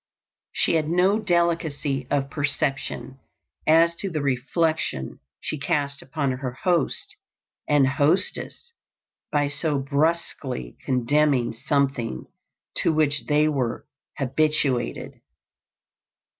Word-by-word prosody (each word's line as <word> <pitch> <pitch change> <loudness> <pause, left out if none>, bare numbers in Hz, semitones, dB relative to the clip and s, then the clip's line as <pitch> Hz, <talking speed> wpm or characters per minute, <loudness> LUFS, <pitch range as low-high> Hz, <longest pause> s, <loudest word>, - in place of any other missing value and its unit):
She - - +1
had 155 -1 -1
no 185 +5 +3
delicacy 165 - 0
of 140 -1 0
perception 140 -2 -2 0.5
as 165 +2 +5
to 195 - -1
the 155 -4 -3
reflection 140 - -1 0.2
she 155 - -4
cast 140 0 -1
upon 140 0 -2
her 130 -1 -4
host 175 -6 +1 0.5
and 145 -2 +4
hostess 155 - 0 0.6
by 145 -1 +2
so 145 +1 -1
brusquely 140 - -1
condemning 130 0 +2
something 125 - -1 0.5
to - - +3
which 150 -2 +1
they 150 0 +3
were 130 -6 -1 0.3
habituated. 135 -2 0
145 Hz, 100 wpm, -24 LUFS, 135-160 Hz, 0.6 s, as